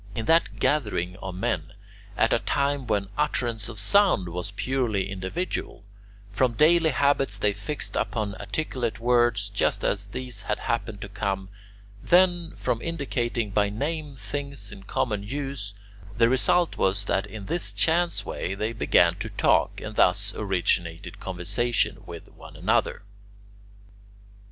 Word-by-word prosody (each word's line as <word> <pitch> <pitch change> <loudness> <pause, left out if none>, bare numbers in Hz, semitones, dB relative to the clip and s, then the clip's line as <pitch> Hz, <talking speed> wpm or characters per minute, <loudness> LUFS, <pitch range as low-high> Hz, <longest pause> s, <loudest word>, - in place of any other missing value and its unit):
In 115 -2 -3
that 165 +5 +3
gathering 90 - 0
of 95 -1 -6
men, 90 - -2 0.4
at - - +3
a - - +3
time 140 -2 0
when 100 -3 0
utterance 115 -3 -1
of 110 - -8
sound 145 - +4
was 90 +3 -4
purely 110 -2 -1
individual, 100 - -4 0.5
from 120 +4 +2
daily 160 +5 +5
habits 135 -5 +2
they 105 0 +1
fixed 150 +7 -5
upon 105 -3 -1
articulate 130 -8 -3
words 120 -3 +2
just 100 - 0
as 100 0 0
these 125 -1 -6
had 105 - -1
happened 110 -2 -3
to 105 - -5
come; 95 -1 -3 0.5
then, 175 -1 +3
from 120 -2 -1
indicating 120 -9 -2
by 105 0 +2
name 145 +6 -3
things 140 -5 -4
in 95 - -10
common 105 +1 -1
use, 130 -3 -5 0.4
the 115 0 +5
result 160 +7 +2
was 95 +1 +1
that 95 +1 0
in 105 -1 -8
this 175 - -1
chance 170 +1 +1
way 95 - -3
they 110 +3 -2
began 90 -6 +4
to - - -4
talk, - - +2
and 110 0 -7
thus 100 +3 +4
originated 90 -4 -1
conversation 95 +6 -1
with 85 -1 -9
one - - -13
another. - - +1
110 Hz, 140 wpm, -26 LUFS, 100-140 Hz, 0.5 s, daily